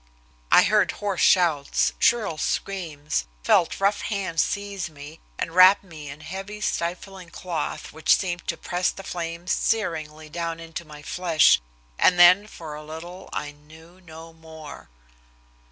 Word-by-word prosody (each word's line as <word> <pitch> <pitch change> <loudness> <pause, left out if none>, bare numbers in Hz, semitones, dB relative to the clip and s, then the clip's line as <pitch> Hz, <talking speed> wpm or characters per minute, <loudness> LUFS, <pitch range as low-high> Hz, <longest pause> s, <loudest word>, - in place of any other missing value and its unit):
I - - +8
heard - - +2
hoarse 200 -3 -3
shouts, 160 -6 +3
shrill 215 -10 +2
screams, 155 - -3 0.2
felt 170 - +2
rough 200 +1 +1
hands 195 -6 -1
seize 200 -4 -3
me, 150 +1 -12 0.2
and - - -3
wrap 185 +3 +7
me 155 -6 -10
in 145 +2 -10
heavy, 195 +6 -7
stifling 185 -1 -4
cloth, 170 -3 -5
which 160 +1 +3
seemed 175 -2 -4
to 170 - -2
press 180 +1 -1
the 195 - -8
flames 170 0 -5
searingly 155 -7 -1
down 165 +1 -4
into 165 +1 -7
my 150 -1 -12
flesh, 165 - +3 0.4
and 180 - +4
then 180 +4 +7
for 160 -6 -9
a 150 +1 -8
little 165 +4 -9
I 145 - -4
knew 160 +5 -18
no 165 0 -12
more. 160 - -12
170 Hz, 145 wpm, -24 LUFS, 155-185 Hz, 0.4 s, I